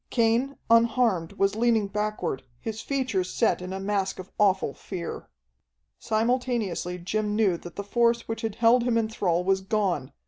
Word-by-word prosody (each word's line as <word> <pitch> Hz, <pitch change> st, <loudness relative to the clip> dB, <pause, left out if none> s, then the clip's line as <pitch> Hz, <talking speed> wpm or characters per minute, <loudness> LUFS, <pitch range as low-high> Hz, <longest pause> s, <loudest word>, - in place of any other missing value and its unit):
Cain, 235 Hz, +4 st, +1 dB
unharmed, 230 Hz, -6 st, +3 dB
was 195 Hz, 0 st, +1 dB
leaning 225 Hz, -2 st, +2 dB
backward, 210 Hz, -8 st, -2 dB, 0.2 s
his 220 Hz, -, -5 dB
features 255 Hz, -10 st, -1 dB
set 225 Hz, -, +1 dB
in 180 Hz, +1 st, -6 dB
a 190 Hz, -, -4 dB
mask 195 Hz, -1 st, -1 dB
of 185 Hz, 0 st, -9 dB
awful 190 Hz, -8 st, +3 dB
fear. 180 Hz, -4 st, -7 dB, 0.7 s
Simultaneously 225 Hz, -6 st, -1 dB
Jim 210 Hz, +4 st, -2 dB
knew 205 Hz, -5 st, +3 dB
that 175 Hz, 0 st, -11 dB
the 200 Hz, -, -4 dB
force 235 Hz, +3 st, +1 dB
which 225 Hz, 0 st, -4 dB
had 220 Hz, -3 st, -3 dB
held 235 Hz, +2 st, +4 dB
him 235 Hz, -1 st, +1 dB
in 225 Hz, -1 st, +1 dB
thrall 180 Hz, -6 st, 0 dB
was 190 Hz, +1 st, +2 dB
gone. 190 Hz, -9 st, -1 dB
210 Hz, 165 wpm, -26 LUFS, 190-230 Hz, 0.7 s, held